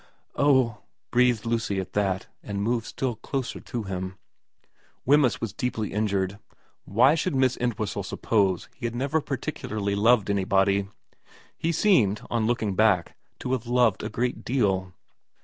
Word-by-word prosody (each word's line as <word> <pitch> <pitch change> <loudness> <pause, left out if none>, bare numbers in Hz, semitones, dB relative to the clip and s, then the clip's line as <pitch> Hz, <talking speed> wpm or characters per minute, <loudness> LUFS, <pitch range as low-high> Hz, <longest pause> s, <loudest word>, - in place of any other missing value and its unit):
' - - -40
Oh,' 130 -6 +3 0.3
breathed 125 -3 +3
Lucy 115 -4 -1
at 95 - -6
that, 95 -2 0 0.2
and 100 -1 -4
moved 115 +1 0
still 125 -4 -3
closer 130 +3 -4
to 120 -3 -5
him. 95 -1 -5 0.9
Wemyss 140 -3 +4
was 115 -4 -4
deeply 110 -2 -3
injured. 100 -1 -1 0.5
Why 125 +8 +4
should 165 0 -1
Miss 130 -1 +3
Entwhistle 110 -4 -2
suppose 95 -1 0
he 120 - -4
had 115 - -6
never 140 +5 0
particularly 110 -7 -3
loved 105 0 +3
anybody? 100 0 +2 0.7
He 165 - -1
seemed, 120 - +3
on 115 -2 +1
looking 115 -4 0
back, 95 -3 +2 0.3
to 125 - -3
have 125 -3 -1
loved 120 -4 +3
a - - -4
great 125 +1 -2
deal. 95 -7 0
110 Hz, 150 wpm, -26 LUFS, 100-125 Hz, 0.9 s, Wemyss